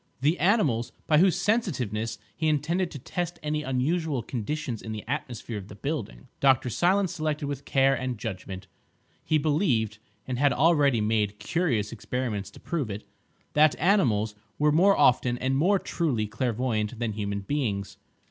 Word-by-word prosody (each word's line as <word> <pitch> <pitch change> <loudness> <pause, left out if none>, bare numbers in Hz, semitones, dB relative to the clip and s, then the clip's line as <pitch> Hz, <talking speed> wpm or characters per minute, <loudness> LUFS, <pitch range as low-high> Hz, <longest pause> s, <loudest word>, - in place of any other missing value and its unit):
The 155 +6 +2
animals, 155 - +2
by 150 -1 +4
whose 185 -1 +5
sensitiveness 125 - 0 0.2
he 160 - -1
intended 160 +4 +1
to 145 - -8
test 175 +6 -4
any 150 0 -1
unusual 140 +1 0
conditions 125 -1 -3
in 110 - -6
the 105 - -6
atmosphere 120 -5 -4
of 95 - -10
the 105 - -11
building, 105 - -4
Dr. 130 -2 +3
Silence 185 - +2
selected 155 -3 -2
with 140 -1 -5
care 135 0 +3
and 130 -2 -2
judgment. 95 -3 -6 0.6
He 155 - +2
believed 140 - +1 0.3
(and 125 -2 -2
had 140 -2 +4
already 145 -5 +3
made 105 -1 0
curious 120 - 0
experiments 115 -3 -3
to - - -15
prove 150 -9 -3
it) 100 +1 -5 0.5
that 150 0 +5
animals 120 - +2 0.2
were 150 0 +3
more 190 +6 +5
often, 125 -1 +4
and 130 +2 0
more 180 +9 +3
truly, 145 - -1
clairvoyant 115 0 -1
than 115 -1 -1
human 100 -1 -3
beings. 100 -4 -2
130 Hz, 155 wpm, -27 LUFS, 110-155 Hz, 0.6 s, whose